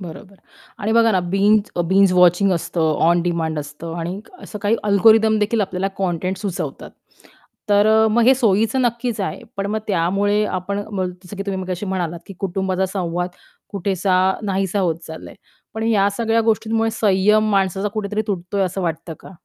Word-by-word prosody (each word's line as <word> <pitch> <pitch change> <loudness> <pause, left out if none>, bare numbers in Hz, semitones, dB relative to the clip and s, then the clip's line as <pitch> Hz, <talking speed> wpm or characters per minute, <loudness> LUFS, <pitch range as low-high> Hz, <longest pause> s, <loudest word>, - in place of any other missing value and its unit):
बरोबर 180 +2 -10 0.4
आणि 215 +2 -1
बघा 230 0 +4
ना, 185 - +2
बिंज 200 +4 +2 0.2
बिंज 190 0 +4
वॉचिंग 180 +2 +4
असतं, 170 0 -2 0.3
ऑन 175 0 +3
डिमांड 165 -3 -1
असतं 150 +3 -7
आणि 175 +4 -4 0.2
असं 210 - -8
काही 215 +3 +2
अल्गोरिदम 220 +2 +4
देखील 215 +1 0
आपल्याला 195 -1 -1
कॉन्टेंट 185 0 -2
सुचवतात. 195 -2 -5 0.8
तर 205 0 +4
अ, 220 0 +4
मग 235 +2 +3
हे 260 +2 +6
सोयीचं 225 0 +1
नक्कीच 235 -2 -1
आहे. 190 - -4
पण 195 - -2
मग 215 +2 -1
त्यामुळे 200 +3 +1
आपण 200 +2 -3
बोल 185 -1 -1
जसं 205 - -10
की 195 - -3
तुम्ही 190 -1 -2
मगाशी 185 +2 -4
म्हणालात, 175 -3 -3
की 195 - -10
कुटुंबाचा 190 0 -1
संवाद 175 -2 -2 0.4
कुठेसा 190 -1 0 0.3
नाहीसा 195 0 -1
होत 170 -4 0
चाललंय. 160 0 -9 0.4
पण 220 - -4
या 205 -3 +3
सगळ्या 230 0 +1
गोष्टींमुळे 225 +1 0
संयम 210 +1 +2
माणसाचा 195 0 +1
कुठेतरी 210 0 -3
तुटतोय, 195 0 -2
असं 185 +1 -2
वाटतं 165 0 -4
का? 190 - -13
195 Hz, 165 wpm, -20 LUFS, 180-215 Hz, 0.8 s, हे